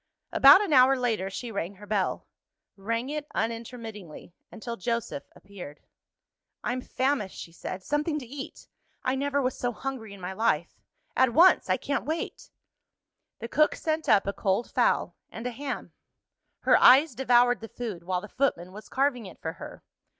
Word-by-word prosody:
About 280 +8 +8
an 400 -7 -1
hour 265 0 +6
later, 225 -6 -1
she 230 +4 -6
rang 200 -2 -4
her 205 +2 -12
bell 200 -2 -1 0.5
rang 230 +6 -3
it 300 -1 -4
unintermittingly, 225 -7 -5 0.2
until 235 +1 -6
Joseph 230 - -3
appeared. 185 -7 -11 0.8
"I'm 250 +1 -2
famished," 260 -7 -1
she 165 - -8
said. 185 +2 -7
"Something 300 - -1
to 275 - -6
eat! 275 +3 -9 0.4
I 255 - +1
never 280 +1 0
was 255 - 0
so 245 - -2
hungry 245 -3 -6
in - - -14
my 180 +1 -5
life. 190 -6 0 0.4
At 260 -2 +3
once 360 +3 +6
I - - +3
can't 285 - -2
wait." 315 +3 -4 0.9
The 230 - -6
cook 305 +5 +3
sent 315 0 -2
up 205 -3 +5
a 200 - -2
cold 195 +4 -1
fowl, - - +1 0.2
and 225 - -8
a 250 - -1
ham. 275 +4 -6 0.7
Her - - +5
eyes 280 +5 +7
devoured 245 -2 +3
the 225 - -8
food, 215 -8 -6
while 180 0 -1
the 210 - -9
footman 195 -9 -1
was 210 +3 -11
carving 260 -5 0
it 185 - -13
for 160 - -4
her. 165 - -10
235 Hz, 170 wpm, -27 LUFS, 200-270 Hz, 0.9 s, About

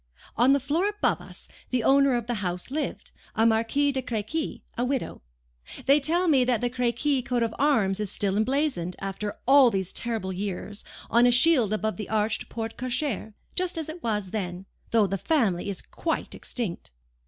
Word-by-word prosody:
On 245 +4 +5
the 280 - +4
floor 315 +9 0
above 415 0 0
us - - -9 0.2
the 250 -2 0
owner 275 0 +4
of 240 -2 -1
the 240 - -2
house 180 +4 -2
lived, 305 +2 -3 0.2
a 225 - +3
Marquise 230 +6 +2
de 265 - -1
Crequy, 240 +7 -3
a 240 - -1
widow. 260 0 -2 0.6
They 275 +2 +6
tell 340 +5 +1
me 275 -6 +5
that 245 -2 +1
the 245 0 -1
Crequy 250 +3 +1
coat 245 -1 0
of 225 -1 -1
arms 220 -10 +2
is 210 -2 -2
still 195 -2 0
emblazoned, 220 - 0
after 195 +1 -4
all 270 -2 +7
these 190 -4 -2
terrible 220 -5 -2
years, 200 +2 -4 0.3
on 240 +1 +6
a - - +5
shield 250 -4 +4
above 215 0 -1
the 210 - -6
arched 215 0 0
porte 225 -1 -5
cochere, 255 -4 -3 0.2
just 365 -1 -1
as 320 -1 -4
it 335 +2 -7
was 210 -6 -2
then, 185 -3 -4 0.2
though 225 -2 +4
the 195 0 -2
family 210 - +1
is 195 - -4
quite 325 - -3
extinct. 220 -9 -4
235 Hz, 185 wpm, -26 LUFS, 210-275 Hz, 0.6 s, all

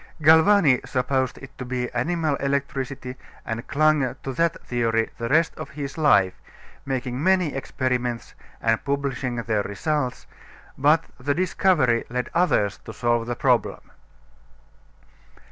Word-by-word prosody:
Galvani 160 -3 +6
supposed 130 0 -1
it 135 0 -12
to - - -3
be 125 0 -2
animal 155 +4 0
electricity 135 -2 -3 0.3
and 115 +1 -5
clung 150 -2 +2
to 135 - -4
that 165 +4 0
theory 115 -2 0
the 115 0 -3
rest 165 +3 +3
of - - -6
his 140 -1 -6
life, 100 - +4 0.5
making 130 -1 -3
many 185 -4 +2
experiments 125 -3 -2 0.3
and 115 -1 +1
publishing 140 -3 -2
their 110 -3 0
results; 125 +6 -2 0.5
but 150 +4 +3 0.2
the 140 +2 -1
discovery 170 -9 +2
led 125 0 -3
others 150 - +1
to - - -8
solve 120 0 0
the 120 - -2
problem. - - 0
130 Hz, 130 wpm, -24 LUFS, 120-150 Hz, 0.5 s, Galvani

